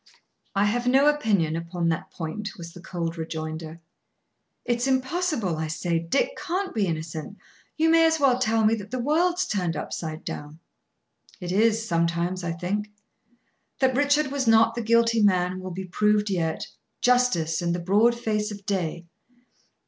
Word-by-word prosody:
"I 200 +1 +3
have 240 +4 0
no 265 +3 +5
opinion 210 - +2
upon 170 0 -2
that 160 - -2
point," 205 +6 -6
was 170 -1 -9
the 175 - -11
cold 170 -2 -4
rejoinder. 160 0 -5 0.9
"It's 240 +1 0
impossible, 260 - 0
I 160 0 -2
say. 165 +1 -1
Dick 220 - 0
can't 375 +3 -3
be 210 -4 +1
innocent. 160 +3 -5 0.4
You 320 +1 +3
may 330 0 +6
as 320 0 +1
well 260 -3 +3
tell 225 -3 +2
me 215 - +4
that 205 -2 -4
the 255 - -3
world's 335 +8 +1
turned 180 -5 -1
upside 155 +1 -5
down." 150 +1 -7 0.8
"It 180 -2 -5
is, 225 +3 +2
sometimes, 170 +2 0
I 170 - -2
think. 200 +5 -3 0.9
That 260 -1 +2
Richard 285 0 +2
was 275 -3 -1
not 225 0 +5
the 235 - -3
guilty 230 0 +3
man 185 -2 +2
will 185 0 -6
be 185 +1 -5
proved 210 +2 +1
yet, 165 -4 -1 0.4
justice, 245 -11 +2
in 170 0 0
the 175 - -1
broad 205 +7 +3
face 210 -2 -1
of 205 -2 -9
day." 175 -4 -2
205 Hz, 165 wpm, -25 LUFS, 170-245 Hz, 0.9 s, may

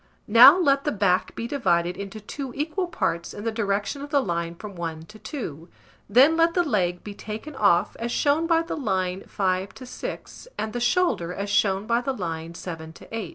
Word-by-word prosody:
Now 245 - +9
let 280 -6 +3
the - - 0
back 195 -3 +1
be 230 - -4
divided 180 -10 +1
into 200 +2 -7
two 250 +5 -6
equal 320 +6 -2
parts 170 - -2
in 205 - -7
the 225 - -1
direction 205 +4 -1
of 285 - -7
the 290 -1 +3
line 170 -7 -2
from 200 +2 -9
1 165 -2 -5
to 215 +5 -14
2; 170 - -7 0.4
then 265 +9 +6
let 330 0 +3
the 355 - +4
leg 180 - 0
be 205 - -7
taken 220 +9 -7
off, 200 -7 +3
as 235 +1 -3
shown 300 +5 +2
by 330 -1 +3
the 330 - -4
line 190 -8 -1
5 185 0 -1
to 255 - -10
6, 250 - -7
and 215 0 -3
the 245 - -2
shoulder, 240 - +1
as 200 0 -4
shown 200 -1 +2
by 235 +2 +1
the 270 +2 -2
line 165 -5 -5
7 160 -2 -7
to 225 - -10
8. 215 -7 -4
210 Hz, 205 wpm, -25 LUFS, 180-275 Hz, 0.4 s, Now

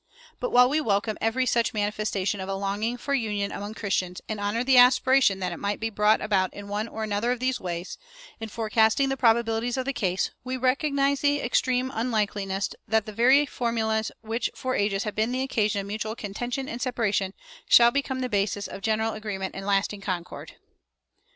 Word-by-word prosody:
But - - -2
while 250 - +6
we 300 +4 +1
welcome 210 -3 0
every 240 +4 +1
such 235 -2 +1
manifestation 205 -2 -1
of 190 - -6
a 195 - -1
longing 205 +5 -2
for 280 +3 -3
union 210 -6 -1
among 205 +2 -6
Christians, 185 -4 -2
and 215 -1 -4
honor 205 +4 -1
the 260 -1 +5
aspiration 255 -3 +5
that 180 -1 -1
it 175 - -6
might 205 +1 -2
be 225 0 -2
brought 210 +1 +3
about 190 -3 +1
in 205 0 -8
one 205 +2 -2
or 220 -1 -5
another 215 +3 0
of 250 - -1
these 255 0 0
ways, 175 0 -5 0.4
in 225 0 -6
forecasting 225 +4 +2
the 270 - 0
probabilities 235 0 +1
of 260 - -2
the 275 - -1
case, 185 -6 -1
we 255 0 -3
recognize 275 +1 +1
the 290 0 +2
extreme 255 +1 +1
unlikeliness 205 -5 -1 0.2
that 220 -2 +2
the 215 - -8
very 260 +6 +5
formulas 225 -4 -1
which 225 +2 -2
for 255 0 -3
ages 200 -2 0
have 210 - -4
been 220 +3 0
the 255 +1 -1
occasions 215 -6 0
of - - -8
mutual 215 +2 -4
contention 245 +6 -4
and 235 - -6
separation 210 -6 -1 0.3
shall 235 0 +7
become 265 -1 -2
the 255 - -1
basis 205 -2 -1
of - - -8
general 220 +1 0
agreement 200 -3 -5
and 195 +1 -7
lasting 200 0 0
concord. 180 -3 -5
220 Hz, 195 wpm, -26 LUFS, 205-250 Hz, 0.4 s, shall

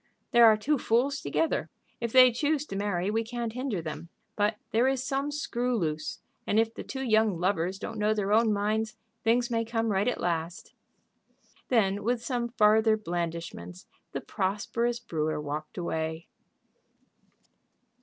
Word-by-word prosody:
There 235 -1 +8
are 215 -1 +6
two 280 +6 0
fools 255 +6 +1
together. 325 - 0 0.3
If 235 -1 -3
they 255 0 +8
choose 295 +4 0
to 195 - -7
marry 195 -1 -1
we 225 +1 0
can't 235 -1 -4
hinder 250 -8 -3
them. 160 +1 -6 0.3
But 210 +1 +1 0.2
there 235 +4 +3
is 265 -1 0
some 275 +1 -1
screw 250 -4 -1
loose, 155 -3 -2 0.3
and 210 - +3
if 225 0 +1
the - - -7
two 265 -1 -5
young 220 -6 +2
lovers 185 0 0
don't 220 +1 -6
know 210 +1 +2
their 205 -1 0
own 225 0 +4
minds 215 +2 -1 0.3
things 240 +2 +2
may 230 -1 +1
come 225 -1 -1
right 195 +3 +1
at 250 - 0
last." 170 0 -3 0.9
Then, 205 -4 +2
with 240 +1 -1
some 240 -2 -1
farther 220 -1 +4
blandishments, 170 - -5 0.3
the - - -4
prosperous 230 +5 -1
brewer 155 -9 -2
walked 150 +1 -5
away. 160 -1 -3
220 Hz, 155 wpm, -28 LUFS, 180-240 Hz, 0.9 s, There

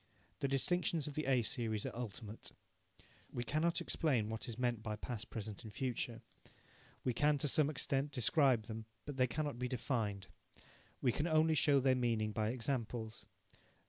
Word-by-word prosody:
The 140 - +1
distinctions 160 +3 +1
of 150 - -4
the 155 0 -2
A 130 -3 +4
series 110 -4 -1
are - - -4
ultimate. 115 -2 -6 0.8
We 120 - -2
cannot 160 +6 +1
explain 125 -10 +1
what 110 0 -4
is 115 - -5
meant 120 -3 0
by 110 -2 -3
past, 115 +1 -5
present 110 0 -5
and 110 - -8
future. 120 0 -2 0.8
We 125 - +1
can, 150 +4 +3
to 145 - +1
some 145 +1 +4
extent, 140 -1 -1
describe 130 -2 +3
them, 110 +1 -6 0.2
but 145 -2 -5
they 130 -1 +4
cannot 145 0 -2
be 125 - 0
defined. 110 -6 -1 0.8
We 125 - +5
can 150 +7 0
only 160 0 +4
show 145 -2 +5
their 130 0 +4
meaning 115 -4 +1
by 110 0 0
examples. 115 -2 -3
125 Hz, 170 wpm, -37 LUFS, 110-145 Hz, 0.8 s, We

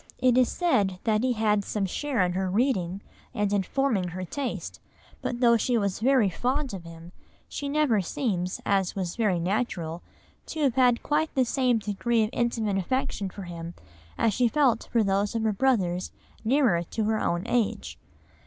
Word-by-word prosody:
It 255 -1 +3
is 255 -1 +4
said 205 - +1
that 215 -2 +2
he 255 0 +1
had 210 -2 +1
some 200 0 -2
share 240 +1 0
in 180 - -1
her 190 0 -1
reading 195 -4 0 0.3
and 205 -1 0
in 200 - +3
forming 225 -3 0
her 185 +2 -5
taste, 275 +7 -5 0.4
but 245 0 -3
though 235 -1 +6
she 240 +2 +1
was 200 -3 -1
very 250 -2 +4
fond 255 - -1
of 180 -3 -7
him 165 +1 -11 0.4
she 285 - -5
never 280 -8 +2
seems, 185 - -2
as 195 -2 +1
was 185 -3 -3
very 205 -7 +1
natural, 175 -3 -2 0.5
to 315 - -4
have 270 -4 +3
had 250 -2 +3
quite 310 +1 0
the 260 -2 +3
same 250 -1 +2
degree 220 +2 0
of 215 - -2
intimate 225 -4 0
affection 200 -1 -2
for 195 +2 -9
him 170 -1 -7 0.4
as 225 - +2
she 245 +2 +3
felt 250 -3 +1
for 230 -2 +3
those 200 +2 0
of 225 - 0
her 220 -1 +1
brothers 190 -7 +1 0.3
nearer 235 -7 +3
to 215 +6 -3
her 220 0 +1
own 175 +1 -1
age. 235 -3 -1
215 Hz, 180 wpm, -27 LUFS, 190-250 Hz, 0.5 s, though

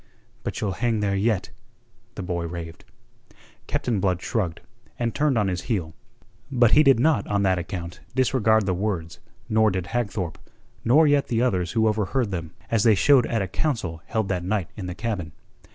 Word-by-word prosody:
"But - - -4
you'll 105 -3 -1
hang 115 -3 +1
there 100 -1 +1
yet," 100 -1 0 0.6
the 100 - -5
boy 85 -2 -2
raved. 85 -1 -8 0.8
Captain 115 -5 -1
Blood 90 -2 +1
shrugged, 90 -5 -2 0.4
and 115 -1 -1
turned 145 -3 +1
on 105 -2 +2
his 90 -1 -2
heel. 85 -9 -1 0.6
But 120 -4 +4
he 150 - +7
did 135 -5 +5
not 130 -6 +2
on 100 -1 +1
that 95 -2 +2
account 90 0 -6 0.2
disregard 110 -5 +3
the 95 - +1
words, 90 -4 -3 0.3
nor 110 0 +3
did 95 -3 -2
Hagthorpe, 100 -5 -3 0.4
nor 150 +7 +5
yet 145 -1 +3
the 115 0 +1
others 90 -8 0
who 110 -1 +3
overheard 110 +2 0
them, 85 -3 -4 0.2
as 115 -2 +3
they 110 -1 +5
showed 130 +4 +5
at 115 -4 0
a - - -3
council 95 - -2
held 110 -3 -1
that 90 -2 -1
night 95 -2 -1
in 95 -4 -6
the 90 - -5
cabin. 95 -8 -3
105 Hz, 185 wpm, -24 LUFS, 90-115 Hz, 0.8 s, he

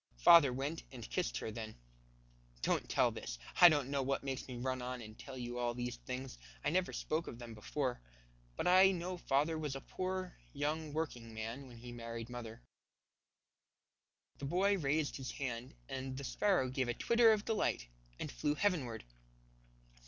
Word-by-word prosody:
Father 145 - +8
went 140 +6 -2
and 120 -4 -8
kissed - - -1
her 110 - -3
then. 110 0 -6 0.9
Don't - - +1
tell - - +4
this. - - -5 0.2
I 175 - +11
don't 145 -4 +1
know 140 -1 +1
what 135 +1 0
makes 135 -1 -3
me 130 - -6
run 130 +1 -1
on 125 0 -4
and 110 -2 -9
tell 130 +2 -9
you 120 0 -4
all 120 -1 0
these 120 0 -3
things. 125 - -6 0.3
I 145 - +3
never 185 +1 +2
spoke 160 +2 -2
of 115 - -6
them 120 -1 -8
before. 125 - -2 0.5
But - - -2
I 185 +2 +8
know 180 +1 -3
father 155 +1 +1
was 150 -3 -2
a - - -3
poor, 185 +2 -3 0.2
young 150 +2 -1
working 125 -8 -3
man 115 +5 -5
when 120 -2 -12
he 120 +1 -9
married 115 0 -6
mother." 120 -1 -7 1.8
The 140 - -4
boy 190 +7 +3
raised 150 0 +1
his 135 -2 -5
hand, 125 -2 -4
and 130 0 -4
the 140 - -5
sparrow 175 -2 +2
gave 130 -1 0
a 120 - -1
twitter 235 -1 +5
of 215 -1 +1
delight 210 - 0 0.3
and - - -4
flew 145 - 0
heavenward. 150 - 0
135 Hz, 175 wpm, -36 LUFS, 120-160 Hz, 1.8 s, I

